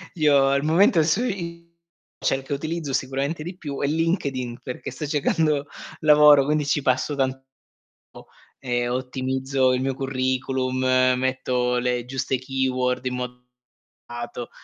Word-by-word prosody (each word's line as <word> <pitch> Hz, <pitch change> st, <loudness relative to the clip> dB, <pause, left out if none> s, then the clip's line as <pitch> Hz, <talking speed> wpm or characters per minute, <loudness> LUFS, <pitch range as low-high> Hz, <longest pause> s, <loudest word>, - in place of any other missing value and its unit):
io 145 Hz, -4 st, +4 dB
al 140 Hz, +1 st, +1 dB
momento 165 Hz, +1 st, +4 dB
su 170 Hz, +9 st, +1 dB
i 170 Hz, -7 st, -4 dB, 0.5 s
cerco, 135 Hz, +1 st, -1 dB
utilizzo, 155 Hz, 0 st, -3 dB
sicuramente 135 Hz, +4 st, -2 dB
di 175 Hz, +3 st, -7 dB
più, 145 Hz, -6 st, -6 dB
è 140 Hz, -, +1 dB
LinkedIn, 140 Hz, -7 st, -1 dB
perché 125 Hz, -, -6 dB
sto 150 Hz, -, -5 dB
cercando 150 Hz, 0 st, +1 dB, 0.4 s
lavoro. 150 Hz, -2 st, +7 dB
Quindi 150 Hz, 0 st, +1 dB
ci 145 Hz, +1 st, +1 dB
passo 130 Hz, +3 st, 0 dB
tanto 135 Hz, -1 st, -1 dB, 1.2 s
e 120 Hz, -1 st, -1 dB
ottimizzo 130 Hz, +1 st, 0 dB
il 125 Hz, -, 0 dB
mio 135 Hz, 0 st, -1 dB
curriculum, 130 Hz, -1 st, -1 dB, 0.4 s
metto 125 Hz, -1 st, 0 dB
le 125 Hz, -1 st, -1 dB
giuste 130 Hz, +1 st, -2 dB
keyword 130 Hz, -1 st, -1 dB
in 125 Hz, 0 st, -1 dB
modo 125 Hz, 0 st, -6 dB, 0.6 s
accurato, 120 Hz, 0 st, -6 dB
135 Hz, 130 wpm, -23 LUFS, 130-150 Hz, 1.2 s, lavoro